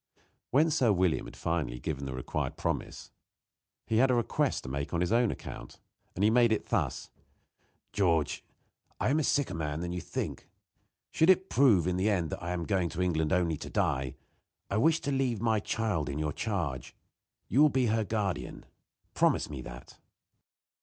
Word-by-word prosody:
When 155 +5 +3
Sir 130 -7 +3
William 90 -4 +1
had - - -11
finally 75 -8 -2
given 70 0 -4
the 65 - -4
required 65 - -3
promise - - -4 0.7
he 110 - 0
had 130 +3 +5
a 125 - +3
request 120 -2 0
to 65 - -7
make 70 +4 -3
on - - +1
his 90 - 0
own 120 0 +3
account. - - -8 0.4
He 105 +2 +4
made 120 -1 +4
it 110 - -1
thus: - - -1 0.8
"George, 85 -6 +1 0.6
I - - +1
am 150 - +3
a - - +1
sicker 140 -8 +1
man 75 -3 -3
than 85 0 -3
you 90 0 -3
think. - - -5 0.6
Should 160 - +3
it 190 0 +4
prove 115 - +5
in 90 0 0
the 95 +4 +2
end 85 -6 0
that - - -5
I 85 - -4
am 90 -1 -2
going 95 -2 0
to 85 +2 -4
England 80 -4 0
only 85 -4 +1
to - - -8
die, 65 -1 -1 0.6
I 100 - +1
wish 160 +8 +3
to 145 - -2
leave 130 -5 0
my 110 0 +2
child 105 -8 -1
in 70 - -3
your 75 -1 -1
charge. 80 - -3 0.5
You 135 - +3
will 150 - +7
be 130 -2 +1
her 110 0 +1
guardian. 105 -2 -3 0.5
Promise - - +2
me 70 -3 -5
that." - - -11
95 Hz, 185 wpm, -30 LUFS, 80-120 Hz, 0.8 s, will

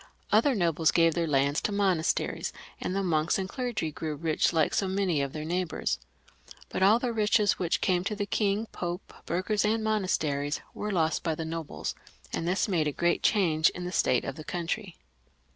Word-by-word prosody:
Other 235 +6 +4
nobles 165 -4 +2
gave 165 -1 +4
their 170 0 0
lands 140 0 +2
to - - -1
monasteries, 190 -5 0 0.3
and 185 - -2
the 195 - 0
monks 160 -3 +1
and 190 -1 -2
clergy 235 - -3
grew 155 0 -4
rich 155 +1 +1
like 160 -2 +2
so 195 - +1
many 185 -5 +1
of 140 -1 -2
their 155 +1 -5
neighbours. 175 0 -1 0.7
But - - -3
all 200 +4 +6
the 240 -1 -2
riches 210 -2 +2
which 175 -2 0
came 180 -2 +2
to 210 - -1
the 205 0 -2
King, 205 +1 0
Pope, 175 +1 -5
burghers, 185 +5 0
and 220 +1 +1
monasteries, 155 -9 0
were 210 - -4
lost 165 -4 +1
by 160 -2 -1
the 160 - -4
nobles, 165 -1 -4 0.4
and 165 - -2
this 185 +5 +1
made 170 -6 +1
a - - 0
great 170 +4 +1
change 165 -7 +3
in 180 - -7
the 180 - -4
state 125 -8 +2
of 135 - -5
the 155 - -7
country. 175 +3 -4
175 Hz, 195 wpm, -28 LUFS, 160-200 Hz, 0.7 s, all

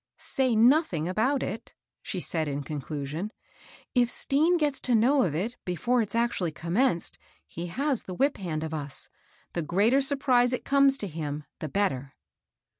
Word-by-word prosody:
^' - - -63 0.2
Say 260 -4 +1
nothing 230 - +4
about 250 +9 +1
it," 215 +4 -6 0.3
she 190 - -4
said 160 -3 -1
in 145 0 -3
conclusion. 150 +5 -4 0.3
*' - - -23
If 240 - +2
Stean 315 +8 +2
gets 295 -4 0
to 245 - +1
know 260 +6 +4
of 165 - 0
it 220 +9 -2
before 235 +8 +1
it's 210 -1 -4
actually 230 -8 0
commenced, 170 - 0 0.3
he 170 +1 -6
has 270 - -1
the 185 - -7
whip 275 +8 +1
hand 160 -5 -3
of 160 0 -4
us. 145 -3 -4 0.4
The 170 - -1
greater 205 - +3
surprise 260 -3 +2
it 250 - -3
comes 275 -1 +4
to 205 - -3
him, 150 -3 -4 0.2
the 155 - -4
better." 140 -8 -1
205 Hz, 175 wpm, -27 LUFS, 160-260 Hz, 0.4 s, nothing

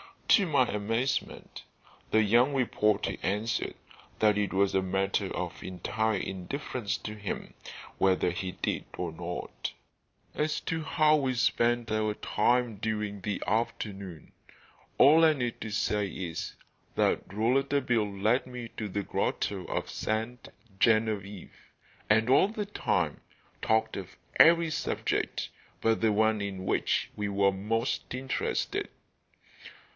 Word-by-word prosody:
To 200 -4 +6
my 140 -5 +4
amazement 115 +5 -2 0.5
the 110 0 +4
young 120 +7 +4
reporter 105 -5 +1
answered 105 +4 -1 0.4
that 105 -1 +4
it 105 -2 0
was 100 0 +2
a 95 - +3
matter 95 +1 0
of - - -4
entire 110 +4 -1
indifference 105 +3 -3
to 105 - -6
him 105 -3 -5 0.5
whether 95 -2 +3
he 90 +1 -4
did - - -2
or 90 -2 -3
not. 85 +2 -5 0.6
As 150 0 0
to 165 -1 -2
how 155 0 +4
we 130 -3 0
spent 120 -1 +1
our 110 -1 0
time 120 +1 +1
during 105 -1 -3
the 100 0 -3
afternoon, 100 -6 -3 0.7
all 155 +4 +7
I 160 -1 +6
need 125 -5 -2
say 105 -1 0
is 90 -3 -5 0.4
that - - +1
Rouletabille 120 0 +1
led 110 +7 +1
me 125 -2 -7
to 110 - -3
the 100 +1 -3
grotto 95 0 -2
of - - -3
Sainte 115 +3 -3 0.3
Genevieve, 105 -4 +1 0.6
and, 110 +2 +4
all 135 +8 +6
the 210 0 -4
time, 90 - -1 0.4
talked 110 0 +1
of 95 -2 -8 0.2
every 165 0 +7
subject - - -1 0.3
but 115 0 +2
the 110 -2 +3
one 110 0 +2
in 95 -2 -4
which - - 0
we 105 -1 -2
were 100 0 +3
most 115 +6 -2
interested. 130 +1 -2
110 Hz, 130 wpm, -29 LUFS, 100-125 Hz, 0.7 s, all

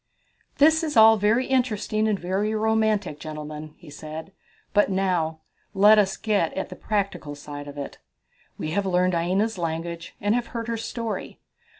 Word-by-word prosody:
"This 315 +3 +5
is 305 -6 -1
all 220 0 +9
very 215 +5 +2
interesting 220 -4 0
and 210 -2 +1
very 195 +4 -1
romantic, 215 -6 +1
gentlemen," 155 0 -7
he 155 - -14
said, 155 +4 -8 0.4
"but 205 - +4
now 180 -5 0 0.3
let 210 +2 +7
us 195 -2 +1
get 205 -7 +1
at 190 - -3
the - - -8
practical 200 -8 -2
side 145 0 -8
of 145 0 -9
it. 140 - -6 0.6
We 155 - -4
have 200 +2 0
learned 180 0 +2
Aina's 185 +5 0
language 170 0 -4
and 205 +1 +1
have 240 0 0
heard 230 0 -4
her 230 - 0
story. 230 0 -5
195 Hz, 165 wpm, -25 LUFS, 160-220 Hz, 0.6 s, all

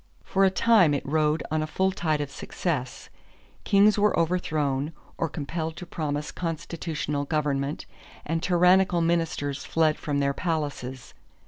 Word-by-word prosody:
For 195 - +1
a 190 - +6
time 190 -6 +4
it 140 - -3
rode 155 +1 +1
on 155 0 +1
a 155 - -2
full 190 +4 +1
tide 155 -5 -1
of 145 -1 -4
success. 135 -5 -4 0.6
Kings 205 +1 +5
were 210 +1 +3
overthrown, 155 -4 0 0.2
or 165 - -1
compelled 160 +1 -4
to 180 - -7
promise 150 -3 -3
constitutional 160 -3 -3
government, 145 -2 -1 0.4
and 165 +1 -1
tyrannical 180 0 +4
ministers 165 -4 -1
fled 160 -2 +1
from 145 -2 -2
their 140 0 +1
palaces. 145 -6 -3
155 Hz, 140 wpm, -26 LUFS, 145-175 Hz, 0.6 s, a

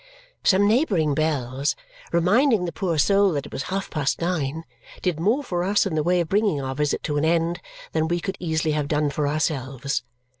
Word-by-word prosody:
Some 200 +1 +4
neighbouring 205 - +2
bells, 140 -2 0 0.4
reminding 210 - +3
the 170 - -3
poor 165 0 -2
soul 200 +4 +4
that 140 -2 -2
it - - -11
was - - -3
half 195 +1 -3
past 140 -2 -1
nine, 160 -3 -2 0.4
did 180 -4 0
more 225 - +1
for 175 -8 -2
us 200 +3 +2
in 195 - -2
the 155 - +1
way 175 +3 +2
of 170 - -3
bringing 200 -4 +1
our 135 -1 -3
visit 150 +1 -1
to 150 -2 -1
an 145 - +1
end 165 +1 +1 0.3
than 160 0 0
we 175 +1 0
could 190 +2 -4
easily 160 -2 0
have 150 -1 -1
done 150 0 +1
for 145 +1 -1
ourselves. 140 -4 -1
160 Hz, 200 wpm, -24 LUFS, 150-185 Hz, 0.4 s, Some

